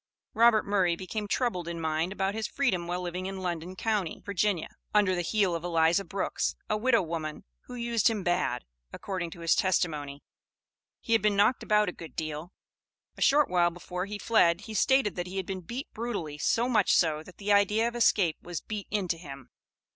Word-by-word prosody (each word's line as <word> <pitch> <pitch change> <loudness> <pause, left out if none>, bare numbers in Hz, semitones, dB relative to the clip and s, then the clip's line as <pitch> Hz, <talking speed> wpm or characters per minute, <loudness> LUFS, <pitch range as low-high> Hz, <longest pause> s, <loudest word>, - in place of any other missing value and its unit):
Robert 230 -1 +5
Murray 190 -4 +2
became 205 +4 -5
troubled 200 -7 -1
in 170 -1 -4
mind 160 +2 -1
about 195 0 -1
his 220 0 -2
freedom 190 -12 0
while 180 +1 -2
living 180 +1 -4
in 195 0 -5
London 175 +1 -4
county, 205 -4 -1
Virginia, 200 -3 0 0.3
under 200 -3 +4
the 175 - 0
heel 195 0 +1
of 165 0 -3
Eliza 170 +2 +2
Brooks, 195 0 -2
a 215 - 0
widow 230 0 +3
woman, 160 -2 -5 0.2
who - - -9
used 235 -3 +2
him 215 -4 -2
bad, 175 - 0 0.3
according 185 -4 -4
to 170 - -11
his 165 0 +3
testimony. 150 -6 0 0.8
He 230 - -1
had 225 - +4
been 210 0 +2
"knocked 205 +5 +3
about 210 0 +3
a - - -1
good 165 -2 -11
deal." 155 +2 -4 0.6
A - - -12
short 290 +1 +5
while 175 -1 +3
before 180 +2 -5
he 210 0 -5
fled, 190 -5 +3
he 215 +2 -8
stated 265 0 +3
that 175 0 -3
he 190 +2 -6
had 190 - -2
been 190 0 -5
beat 240 - -7
brutally, 200 -11 -4
so 235 +9 +2
much 220 -6 +3
so 155 -3 +3
that 180 +3 -14
the 205 0 +1
idea 210 +3 +3
of 235 - -5
escape 200 -8 +3
was 175 -2 -5
beat 210 -2 -6
into 185 -5 -1
him. 135 -6 -10
185 Hz, 200 wpm, -28 LUFS, 170-210 Hz, 0.8 s, Robert